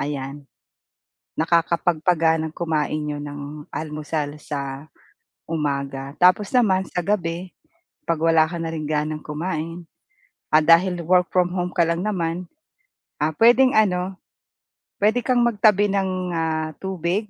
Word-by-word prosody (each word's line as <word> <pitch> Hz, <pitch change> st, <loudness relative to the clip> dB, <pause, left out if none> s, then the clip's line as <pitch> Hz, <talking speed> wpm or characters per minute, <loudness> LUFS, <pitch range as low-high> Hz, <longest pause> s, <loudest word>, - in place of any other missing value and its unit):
Ayan 140 Hz, 0 st, -5 dB, 0.9 s
nakakapagpag-ganang 165 Hz, -1 st, +1 dB
kumain 155 Hz, -2 st, -1 dB
n'yo 150 Hz, -1 st, -3 dB
ng 145 Hz, +1 st, -7 dB
almusal 150 Hz, -1 st, -4 dB
sa 140 Hz, 0 st, -6 dB, 0.5 s
umaga. 140 Hz, -3 st, -3 dB
Tapos 185 Hz, +3 st, +4 dB
naman 210 Hz, -7 st, +3 dB
sa 175 Hz, -1 st, -3 dB
gabi 180 Hz, -3 st, -2 dB, 0.5 s
'pag 165 Hz, -2 st, -1 dB
wala 165 Hz, -1 st, +4 dB
ka 170 Hz, +1 st, -5 dB
na 165 Hz, -, -3 dB
rin 160 Hz, -2 st, -4 dB
ganang 150 Hz, 0 st, -2 dB
kumain, 165 Hz, +1 st, -4 dB, 0.6 s
at 155 Hz, 0 st, +4 dB
dahil 175 Hz, +2 st, +5 dB
work 180 Hz, 0 st, +3 dB
from 180 Hz, -1 st, +1 dB
home 180 Hz, -1 st, -1 dB
ka 170 Hz, -1 st, +2 dB
lang 170 Hz, +1 st, -1 dB
naman 180 Hz, -3 st, -2 dB, 0.9 s
puwedeng 250 Hz, +3 st, +6 dB
ano, 190 Hz, -3 st, +1 dB, 0.8 s
puwede 215 Hz, +4 st, +2 dB
kang 245 Hz, -1 st, +2 dB
magtabi 205 Hz, -2 st, +3 dB
ng 185 Hz, -2 st, -1 dB, 0.5 s
tubig, 190 Hz, +2 st, -2 dB
165 Hz, 120 wpm, -22 LUFS, 155-185 Hz, 0.9 s, puwedeng